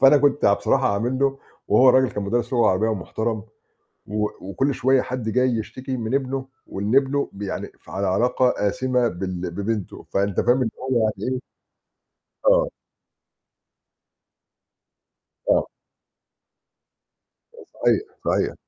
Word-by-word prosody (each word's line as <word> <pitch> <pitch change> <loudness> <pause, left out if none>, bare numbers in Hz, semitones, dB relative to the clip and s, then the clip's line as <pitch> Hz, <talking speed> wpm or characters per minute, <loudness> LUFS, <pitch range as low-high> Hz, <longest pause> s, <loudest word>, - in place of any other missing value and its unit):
فأنا 135 +2 +8
كنت 145 0 +2
يع 100 - +6
بصراحة 130 +1 +2
عامل 120 +6 -1
له 135 0 +1 0.3
وهو 130 - +6
الرجل 130 0 +5
كان 105 - -4
مدرّس 120 +5 -1
لغة 120 -2 +4
عربية 95 +4 +2
ومحترم 110 +1 -2 0.6
و 105 +1 -1
وكل 130 +9 -1
شوية 130 +1 +3
حد 125 -3 -4
جاي 125 +3 +2
يشتكي 130 +3 -4
من 115 +1 -3
ابنه 135 -1 -1 0.2
وإن 100 +6 -1
ابنه 140 +1 +2
ب 100 - -9
يعني 95 - -4
ف - - -16
على 100 0 -2
علاقة 125 +6 +2 0.2
آسمة 125 +3 +1
بال 90 -2 -4
ببنته 100 +2 -4
فأنت 100 -1 +1
فاهم 130 +2 +3
إن 115 - +1
هو 130 -2 0
يعني 110 +3 -1
إيه؟ 125 - -3 1.1
آه. - - +4 2.8
آه. - - +3 1.9
آآ 470 - -13 0.2
صحيح، - - +3 0.2
صحيح. - - +1
120 Hz, 135 wpm, -23 LUFS, 100-130 Hz, 2.8 s, فأنا